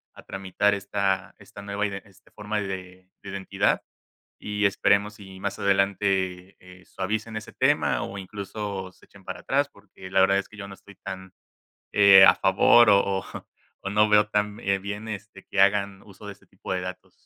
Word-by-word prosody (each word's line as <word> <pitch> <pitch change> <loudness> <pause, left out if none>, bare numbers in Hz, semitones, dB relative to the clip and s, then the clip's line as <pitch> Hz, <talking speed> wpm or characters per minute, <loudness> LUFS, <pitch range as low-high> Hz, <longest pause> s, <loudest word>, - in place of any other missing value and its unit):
a - - -13
tramitar 95 +1 0
esta 100 -1 -2
esta 100 - -12
nueva 100 +1 -3
iden 100 -1 -6
este 100 -3 -23
forma 105 0 -4
de 95 -1 -7
de 100 - -10
identidad, 95 -1 0 0.6
y 105 0 -1
esperemos 100 +2 +1
y 95 -1 -12
más 100 0 -4
adelante, 95 -2 0
eh, 90 0 -16
suavicen 110 +3 -4
ese 110 - -7
tema - - +1
o, 100 - -6
incluso, 100 0 -6
se - - -23
echen 100 -1 -19
para 90 -1 -7
atrás, 140 +1 0
porque 95 -2 -14
la 95 - +3
verdad 100 +1 +4
es 100 - -4
que 105 - -15
yo 100 -1 -7
no 100 - -9
estoy 100 +1 -17
tan, 95 -1 -7 0.6
eh, 100 -1 +8
a - - +7
favor, 105 +4 +5
o 100 -1 +6 0.2
o - - -10 0.6
o, 100 - -4
no 105 +1 +4
veo 105 0 +5
tan, 105 0 -1
eh, 100 0 0
bien 100 +3 -6
este 105 0 -8
que 100 - -2
hagan 100 0 +2
uso 100 0 -15
de 100 - -7
ese 100 - -25
tipo 95 - -9
de 90 - -2
datos. 90 0 -8
100 Hz, 190 wpm, -25 LUFS, 95-105 Hz, 0.6 s, eh